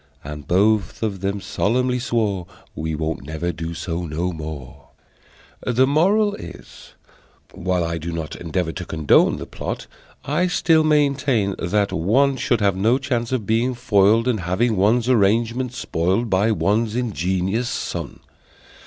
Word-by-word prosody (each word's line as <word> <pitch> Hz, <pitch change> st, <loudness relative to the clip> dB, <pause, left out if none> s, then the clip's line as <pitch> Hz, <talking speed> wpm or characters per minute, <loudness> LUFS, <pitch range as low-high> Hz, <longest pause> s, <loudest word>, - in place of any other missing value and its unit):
And 75 Hz, -1 st, -8 dB
both 105 Hz, +4 st, +2 dB
of 100 Hz, -3 st, -2 dB
them 100 Hz, +1 st, -1 dB
solemnly 125 Hz, +6 st, 0 dB
swore 105 Hz, -7 st, -1 dB, 0.3 s
"We 80 Hz, 0 st, -3 dB
won't 80 Hz, -1 st, -3 dB
never 80 Hz, +4 st, -3 dB
do 80 Hz, +1 st, -6 dB
so 85 Hz, +1 st, -4 dB
no 85 Hz, +4 st, -2 dB
more!" 75 Hz, -5 st, -8 dB, 0.8 s
The 125 Hz, +1 st, +3 dB
Moral 195 Hz, +9 st, +3 dB
is: -, -, -11 dB, 0.6 s
While 90 Hz, -1 st, -1 dB
I 85 Hz, 0 st, -2 dB
do 85 Hz, +2 st, -5 dB
not 80 Hz, -2 st, -5 dB
Endeavor 85 Hz, 0 st, -2 dB
to 90 Hz, +1 st, -6 dB
condone 80 Hz, -3 st, +3 dB
the -, -, -6 dB
plot, -, -, -5 dB, 0.4 s
I 160 Hz, +6 st, +1 dB
still 165 Hz, -2 st, +3 dB
maintain 140 Hz, -8 st, +2 dB
that 100 Hz, +4 st, 0 dB
one 130 Hz, -, +2 dB
Should 120 Hz, -2 st, 0 dB
have 100 Hz, -2 st, +2 dB
no 110 Hz, +7 st, +3 dB
chance 120 Hz, -3 st, -2 dB
of 125 Hz, -5 st, -1 dB
being 115 Hz, +4 st, +1 dB
foiled, 115 Hz, -1 st, +3 dB
And 120 Hz, -4 st, +1 dB
having 95 Hz, +7 st, 0 dB
one's 110 Hz, +5 st, +2 dB
arrangements 115 Hz, +2 st, +1 dB
spoiled 95 Hz, +8 st, -1 dB
By 100 Hz, +4 st, +3 dB
one's 105 Hz, +4 st, +1 dB
ingenious 100 Hz, 0 st, -1 dB
son. 115 Hz, -, -5 dB
105 Hz, 145 wpm, -21 LUFS, 85-125 Hz, 0.8 s, The